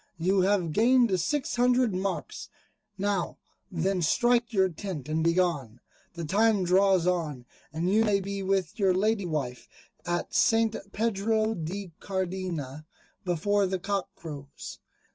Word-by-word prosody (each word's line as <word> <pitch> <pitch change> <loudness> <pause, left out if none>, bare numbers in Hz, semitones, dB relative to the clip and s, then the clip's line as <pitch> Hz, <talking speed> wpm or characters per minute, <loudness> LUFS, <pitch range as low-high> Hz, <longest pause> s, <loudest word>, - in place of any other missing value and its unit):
you 185 +3 +2
have 185 -3 +1
gained 235 -3 +4
six 275 - -1
hundred 245 -2 +3
marks. 190 +1 -4 0.5
Now 200 -2 -1 0.3
then 185 +2 0
strike 240 +8 +2
your 190 -4 +3
tent 170 -5 -6
and 155 +1 0
be 170 0 +3
gone. 145 -11 0 0.4
The 170 -1 -4
time 210 +3 +3
draws 190 0 +4
on, 160 -8 -1 0.3
and 165 +3 -2
you 215 +4 +4
may 205 -3 +2
be 200 +1 -4
with 195 +2 -1
your 190 -3 +3
Lady 205 0 +1
Wife 140 -6 -3 0.4
at 175 0 -2
St. 225 -1 +3 0.2
Pedro 220 0 0
de 185 +1 -5
Cardena, 180 -7 -4 0.4
before 195 +3 +1
the 190 0 -1
cock 195 +1 -2
crows." 145 -3 -9
190 Hz, 140 wpm, -28 LUFS, 170-205 Hz, 0.5 s, gained